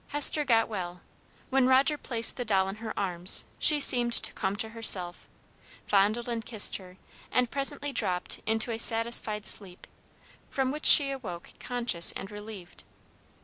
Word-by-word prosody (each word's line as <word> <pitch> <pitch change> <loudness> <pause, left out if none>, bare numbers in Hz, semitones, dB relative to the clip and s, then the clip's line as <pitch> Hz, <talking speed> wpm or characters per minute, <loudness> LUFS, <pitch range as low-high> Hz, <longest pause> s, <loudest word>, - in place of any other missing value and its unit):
Hester 295 +1 +3
got 230 -5 0
well. 180 -4 -8 0.5
When 265 -1 +1
Roger 265 +3 +1
placed 230 -5 +1
the 245 - -6
doll 195 -4 -1
in 195 - -9
her 220 0 -9
arms, 180 -2 +1
she 300 -1 +4
seemed 240 -4 +3
to - - +5
come 190 +1 -5
to 220 +2 -6
herself, 195 -6 +1 0.6
fondled 210 +4 -1
and 230 -2 -6
kissed 220 -2 +1
her, 185 -1 -17 0.3
and 250 -2 -2
presently 280 +1 -2
dropped 180 -6 -3
into 225 +2 -2
a 225 - -6
satisfied 225 -2 0
sleep, 185 -4 0 0.6
from 265 -1 -3
which 300 +2 +1
she 280 -2 +7
awoke 190 -11 -10
conscious 240 -9 0
and 195 - -10
relieved. 205 -4 -13
225 Hz, 155 wpm, -26 LUFS, 195-250 Hz, 0.6 s, she